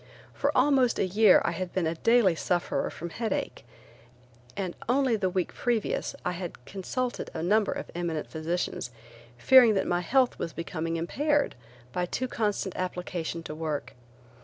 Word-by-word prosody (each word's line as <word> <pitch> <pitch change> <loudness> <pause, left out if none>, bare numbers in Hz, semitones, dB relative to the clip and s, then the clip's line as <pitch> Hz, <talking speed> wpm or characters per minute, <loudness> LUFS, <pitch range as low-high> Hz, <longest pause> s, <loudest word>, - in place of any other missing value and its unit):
For - - 0
almost 265 -4 +4
a - - +2
year 200 +2 +5
I - - +1
had 185 -2 -4
been 185 -3 0
a 160 - 0
daily 225 +2 +4
sufferer 175 +2 -1
from 170 0 -7
headache, 225 0 -3 0.9
and 185 -3 -3
only 260 -2 +3
the 195 -3 0
week 180 -1 -2
previous 235 -3 -1
I 180 - +1
had 175 -8 -7
consulted 240 +6 -3
a 160 - -3
number 210 +4 +3
of - - -5
eminent 170 -3 -2
physicians 160 -4 -3 0.5
fearing 240 - +7
that 195 - +1
my 175 0 0
health 255 +7 +2
was 165 - -3
becoming 165 +1 -3
impaired 290 - +1 0.4
by 180 0 -1
too 255 +8 -2
constant 205 -5 -1
application 180 -2 -3
to 150 - -6
work. 155 -2 -4
185 Hz, 160 wpm, -28 LUFS, 170-230 Hz, 0.9 s, fearing